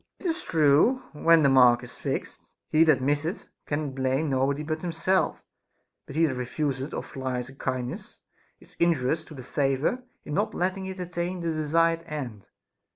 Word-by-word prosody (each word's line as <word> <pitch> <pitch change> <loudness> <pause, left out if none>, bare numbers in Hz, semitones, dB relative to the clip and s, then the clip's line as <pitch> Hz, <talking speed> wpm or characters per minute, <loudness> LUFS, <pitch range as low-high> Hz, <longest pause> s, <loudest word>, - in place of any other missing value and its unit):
It - - -15
is 330 -2 0
true, 160 - +3
when 165 +1 +5
the 140 - +5
mark 125 -2 +6
is - - -9
fixed, - - -4 0.3
he 155 +1 +6
that 140 -5 +3
misseth 145 +7 -1 0.2
can 145 -1 -2
blame 135 +3 0
nobody 135 +3 +1
but 155 +1 -3
himself; 175 +2 0 0.6
but 140 - -9
he 165 +1 +4
that 145 - 0
refuseth 135 +2 -2
or - - -4
flies 130 -2 -4
a - - -12
kindness 125 -2 -4 0.4
is - - -18
injurious 160 -2 +2
to 155 - -12
the 130 - -8
favor 135 - 0 0.2
in 150 - -5
not 210 +6 0
letting 190 +1 -1
it 190 0 -6
attain 175 0 -3
the 170 - -1
desired 165 +1 +2
end. 130 -10 -6
150 Hz, 170 wpm, -27 LUFS, 135-165 Hz, 0.6 s, mark